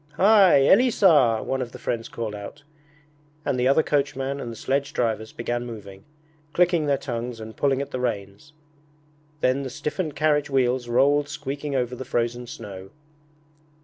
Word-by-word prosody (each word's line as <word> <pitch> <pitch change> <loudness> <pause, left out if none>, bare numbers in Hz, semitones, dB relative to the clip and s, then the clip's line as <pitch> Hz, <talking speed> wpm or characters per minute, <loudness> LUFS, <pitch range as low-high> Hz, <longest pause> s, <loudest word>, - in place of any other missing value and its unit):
'Hy, 195 -2 +6
Elisar!' 165 - +4
One 130 0 -1
of 120 -2 -5
the - - -8
friends 115 -1 -3
called 115 -2 -5
out, 105 +7 -9 0.8
and 125 - 0
the 125 - +2
other 140 +4 +4
coachman 140 -1 -1
and 120 - -5
the - - -8
sledge 135 +5 -2
drivers 110 -2 -1
began 120 +1 -3
moving, 100 -5 -10 0.5
clicking 175 -3 +2
their 140 -1 +2
tongues 120 -3 -5
and 110 0 -9
pulling 140 -1 +1
at - - -11
the 130 - -3
reins. 105 +3 -4 0.9
Then 130 +2 +2
the 135 - -4
stiffened 150 +4 -4
carriage 150 -1 +1
wheels 125 -2 +1
rolled 140 +4 +3
squeaking 145 -1 -4
over 125 -1 -1
the 130 - -6
frozen 120 -1 -2
snow. 95 -5 -9
130 Hz, 160 wpm, -24 LUFS, 115-145 Hz, 0.9 s, Hy